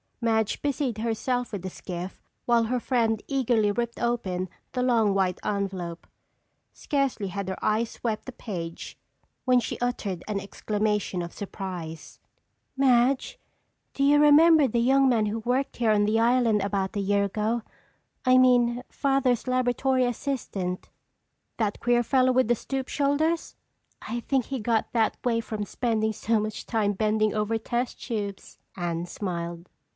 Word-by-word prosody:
Madge 220 -2 +1
busied 275 -5 -1
herself 235 +2 -1
with 200 -4 -5
the 190 - -3
skiff 180 +1 -7 0.2
while 235 -1 +3
her 250 +2 0
friend 225 -3 +1
eagerly 240 -6 +2
ripped 235 +2 -3
open 190 -7 -1 0.2
the 250 - -2
long 230 -5 +3
white 185 -2 +1
envelope. 190 -4 -3 0.7
Scarcely 275 -8 -1
had 190 0 -4
her 190 - -3
eyes 220 +2 +1
swept 220 -3 -3
the 260 - -6
page 170 -9 -6 0.5
when 255 -1 +5
she 235 - -4
uttered 210 -7 -2
an 210 -2 -1
exclamation 210 -1 -1
of 170 - -7
surprise. 180 -6 -7 0.6
"Madge, 265 - +3 0.5
do 275 - -1
you 290 +1 +5
remember 300 0 +7
the 235 0 0
young 265 +3 +4
man 220 -4 +2
who 215 +2 -2
worked 255 +4 -1
here 230 -3 +2
on 205 -1 +3
the 215 +2 +2
island 230 -2 +3
about 200 +1 -1
a - - 0
year 200 0 +2
ago? 215 +4 -1 0.6
I 255 0 +6
mean 245 -1 +4
Father's 270 -4 +1
laboratory 255 +1 +2
assistant." 220 -8 -3 0.7
"That 210 -3 -1
queer 240 0 +2
fellow 255 +1 +3
with 255 -2 +3
the 240 - +3
stoop 265 +3 -4
shoulders?" 300 +4 0 0.5
"I 235 +2 -2
think 265 -1 0
he 270 -2 -4
got 225 0 0
that 225 -2 +2
way 230 -2 +1
from 215 -2 -4
spending 220 0 -1
so 225 +1 +1
much 215 0 -4
time 210 -3 0
bending 215 +1 +1
over 215 +1 0
test 240 +2 -3
tubes," 205 -4 -5 0.2
Anne 175 -2 -2
smiled. 170 -2 -5
225 Hz, 150 wpm, -26 LUFS, 205-250 Hz, 0.7 s, remember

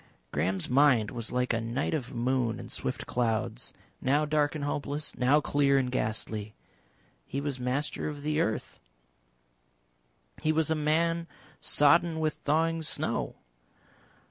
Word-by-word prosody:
Graham's 90 +5 0
mind 130 -5 +4
was 120 -2 -3
like 125 0 +1
a 115 - 0
night 120 +7 -1
of 135 -4 -2
moon 125 -1 0
and - - -8
swift - - -3
clouds, 115 - -1 0.3
now 145 +4 +2
dark 150 -1 +1
and 150 - -3
hopeless, 145 +1 -3
now 130 +4 +4
clear 140 -1 +3
and 130 -2 +1
ghastly. 110 -2 -2 0.7
He 140 - -3
was 140 -2 -2
Master 130 +4 -1
of 145 -1 -7
the 150 +1 0
Earth, 110 -9 -2 1.6
he 155 - +2
was 160 0 +1
a - - +3
man 165 +2 +1 0.3
sodden 160 +3 +4
with 155 -1 +1
thawing 165 +2 +1
snow. 155 - -2
140 Hz, 140 wpm, -29 LUFS, 125-155 Hz, 1.6 s, mind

